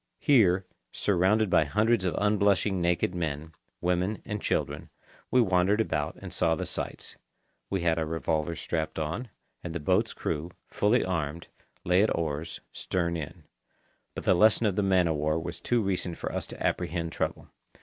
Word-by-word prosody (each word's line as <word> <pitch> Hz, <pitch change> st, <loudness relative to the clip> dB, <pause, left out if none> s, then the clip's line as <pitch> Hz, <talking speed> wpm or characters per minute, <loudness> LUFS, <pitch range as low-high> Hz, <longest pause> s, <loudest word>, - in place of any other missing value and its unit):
Here, 95 Hz, -9 st, +4 dB, 0.3 s
surrounded 100 Hz, +2 st, +2 dB
by 85 Hz, -, +5 dB
hundreds 105 Hz, +6 st, +2 dB
of 90 Hz, -, 0 dB
unblushing 100 Hz, -2 st, +2 dB
naked 85 Hz, +1 st, +1 dB
men, 80 Hz, -2 st, -3 dB, 0.3 s
women, 90 Hz, +4 st, 0 dB
and 105 Hz, -2 st, -4 dB
children, -, -, -2 dB, 0.4 s
we 125 Hz, -, +4 dB
wandered 95 Hz, 0 st, +3 dB
about 75 Hz, -9 st, -1 dB
and -, -, -8 dB
saw -, -, +2 dB
the -, -, -3 dB
sights. -, -, -5 dB, 0.5 s
We 95 Hz, -2 st, -1 dB
had 85 Hz, -1 st, +2 dB
our 80 Hz, -, 0 dB
revolvers 80 Hz, 0 st, -1 dB
strapped 80 Hz, -2 st, -3 dB
on, 80 Hz, +11 st, -3 dB, 0.3 s
and 85 Hz, -1 st, -5 dB
the -, -, -1 dB
boat's 75 Hz, -, +1 dB
crew, 75 Hz, +3 st, -3 dB, 0.2 s
fully 110 Hz, +4 st, +2 dB
armed, 85 Hz, -3 st, -3 dB, 0.3 s
lay 90 Hz, +2 st, +4 dB
at 110 Hz, -, +4 dB
the -, -, 0 dB
oars, 80 Hz, -1 st, -3 dB
stern 85 Hz, -2 st, -1 dB
in; 80 Hz, -4 st, -6 dB, 0.7 s
but -, -, -5 dB
the -, -, +4 dB
lesson 110 Hz, +5 st, +4 dB
of 100 Hz, -3 st, +1 dB
the 105 Hz, -, +2 dB
man 95 Hz, -3 st, +3 dB
of 80 Hz, -2 st, 0 dB
war 75 Hz, +2 st, +1 dB
was 85 Hz, 0 st, -5 dB
too 120 Hz, -2 st, +1 dB
recent 90 Hz, -3 st, -2 dB
for -, -, -4 dB
us -, -, -3 dB
to -, -, -6 dB
apprehend 85 Hz, -1 st, -1 dB
trouble. -, -, -3 dB
90 Hz, 175 wpm, -28 LUFS, 80-100 Hz, 0.7 s, by